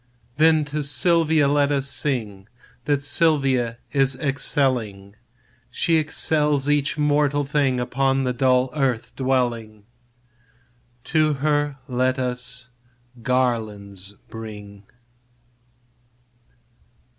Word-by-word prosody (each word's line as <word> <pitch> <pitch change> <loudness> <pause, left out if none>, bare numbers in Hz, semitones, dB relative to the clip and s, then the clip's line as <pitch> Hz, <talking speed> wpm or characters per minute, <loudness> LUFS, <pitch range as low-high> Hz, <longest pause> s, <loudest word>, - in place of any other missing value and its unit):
Then 155 -1 +4
to 150 +1 -3
Silvia 160 0 +2
let 145 0 +2
us 140 -1 0
sing, 110 -9 -2 0.4
That 145 -1 0
Silvia 135 -6 +2
is 135 -2 +2
excelling; 125 -7 -1 0.5
She 165 -1 +1
excels 150 -2 +1
each 145 0 +1
mortal 145 -1 +1
thing 135 -3 0
Upon 135 +2 0
the 125 -1 -1
dull 130 0 +2
earth 130 -6 -2
dwelling: 120 -5 -2 1.2
To 155 -1 +1
her 145 0 0
let 130 0 0
us 125 -1 -4 0.5
garlands 105 -6 -2
bring. 105 -2 -10
135 Hz, 90 wpm, -22 LUFS, 120-145 Hz, 1.2 s, Then